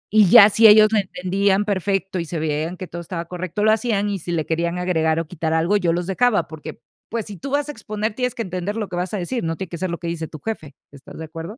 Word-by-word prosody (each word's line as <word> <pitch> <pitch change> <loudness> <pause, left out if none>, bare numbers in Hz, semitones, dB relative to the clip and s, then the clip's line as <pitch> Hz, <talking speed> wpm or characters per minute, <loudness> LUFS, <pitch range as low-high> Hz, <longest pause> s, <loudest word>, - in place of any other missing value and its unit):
Y 210 -2 +7
ya 200 +3 +9
si 225 +2 +7
ellos 215 0 +8
le 220 - +3
entendían 195 +2 +1
perfecto 195 -1 -1
y 170 - -3
se 165 +1 -5
veían 155 +3 -2
que 185 - -6
todo 175 -1 -7
estaba 170 0 -5
correcto, 180 +3 -4
lo 215 - +5
hacían, 215 -2 0
y 195 - -3
si 175 - -6
le 160 -3 -1
querían 170 +2 -1
agregar 165 -3 +1
o 165 - -3
quitar 160 0 -3
algo, 165 +5 +2
yo 180 -5 +2
los 175 +1 -1
dejaba 210 +4 +1
porque, 160 -1 -9 0.3
pues, 225 -2 -3
si 205 - -8
tú 275 +9 -7
vas 285 +1 0
a - - -4
exponer, 215 -3 -4
tienes 250 +1 -2
que 230 - -3
entender 185 +1 -4
lo 215 -3 -3
que 180 - -5
vas 180 +3 -2
a - - -1
decir, 230 +7 -3
no 165 0 -2
tiene 190 -3 -6
que 170 - -7
ser 185 - -2
lo 170 - -3
que 170 - -10
dice 165 -1 -3
tu 155 - -10
jefe, 155 -6 -6 0.2
¿estás 140 -1 -13
de 160 - -6
acuerdo? 165 +7 -8
185 Hz, 280 wpm, -21 LUFS, 165-210 Hz, 0.3 s, ya